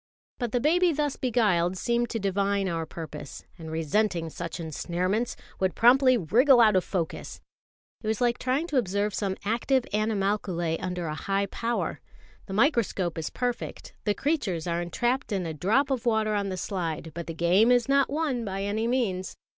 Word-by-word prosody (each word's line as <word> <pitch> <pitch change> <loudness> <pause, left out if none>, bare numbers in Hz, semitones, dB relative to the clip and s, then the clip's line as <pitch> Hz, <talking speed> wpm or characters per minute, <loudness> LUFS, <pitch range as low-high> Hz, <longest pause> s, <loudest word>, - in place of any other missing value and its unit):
But 240 -3 -2
the 245 - +1
baby 345 +6 +3
thus 295 -2 -1
beguiled 195 -8 +1
seemed 235 +4 0
to 230 - -2
divine 200 0 0
our 165 -2 -2
purpose; 155 -3 -8
and, 160 -1 -7
resenting 165 +2 0
such 170 +1 -5
ensnarements, 180 +8 -2 0.2
would 190 -1 0
promptly 255 +2 +6
wriggle 240 - +5
out 215 -4 +6
of 185 - +3
focus. 170 -5 -4 0.6
It 215 - -6
was 220 -1 0
like 240 -1 +1
trying 260 +5 0
to 290 - 0
observe 205 -2 0
some 195 -2 -2
active 240 +4 +1
animalculæ 195 -5 0
under 180 -1 -3
a 155 - -3
high 195 +5 -1
power. 230 +4 -3 0.5
The 190 - -6
microscope 205 - +1
is 160 - -3
perfect, 245 -1 -4
the 210 -2 +1
creatures 215 - -1
are 170 0 -1
entrapped 240 +9 -1
in 190 -3 -1
a 160 - -3
drop 225 - +1
of 250 -2 -1
water 220 -2 +2
on 200 -1 0
the 185 - -4
slide; 165 -4 -3
but 170 0 -6
the 165 - -5
game 185 +8 +4
is 245 0 +3
not 275 0 +3
won 285 -5 -1
by 195 -2 -3
any 215 +3 -1
means. 215 -7 -1
205 Hz, 180 wpm, -27 LUFS, 175-240 Hz, 0.6 s, promptly